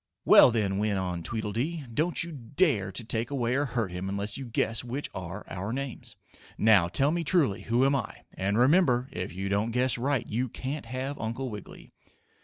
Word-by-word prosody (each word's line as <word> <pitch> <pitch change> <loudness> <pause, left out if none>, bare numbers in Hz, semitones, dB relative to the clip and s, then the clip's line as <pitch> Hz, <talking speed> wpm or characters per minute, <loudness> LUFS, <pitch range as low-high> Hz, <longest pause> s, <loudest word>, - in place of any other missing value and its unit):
"Well, - - +8
then," 100 -4 0
went 105 -1 0
on 90 -2 -2
Tweedledee, 120 - -3
"don't 165 +7 +2
you 170 - -7
dare 130 - 0
to 115 - -5
take 115 +2 -1
away 125 -4 -1
or 140 +3 +1
hurt 115 -7 -2
him 90 +2 -4
unless 100 +2 -2
you 135 -2 -6
guess 115 0 0
which 125 +4 -4
are 95 +2 -6
our 95 +3 -5
names. 135 0 -5 0.4
Now 105 -5 +5
tell 135 +11 +3
me 170 +1 -1
truly 150 - +2
who 120 +4 +2
am 140 +1 +3
I? 125 -6 -4
And, 100 +2 -1
remember, 130 -2 +3
if 90 +2 -4
you 95 +2 -4
don't 100 +3 0
guess 125 +1 +1
right, 135 -1 0
you 120 +3 -2
can't 135 +3 -5
have 130 +4 -4
Uncle 115 +3 -3
Wiggily!" 105 -2 -10
115 Hz, 195 wpm, -28 LUFS, 100-135 Hz, 0.4 s, Well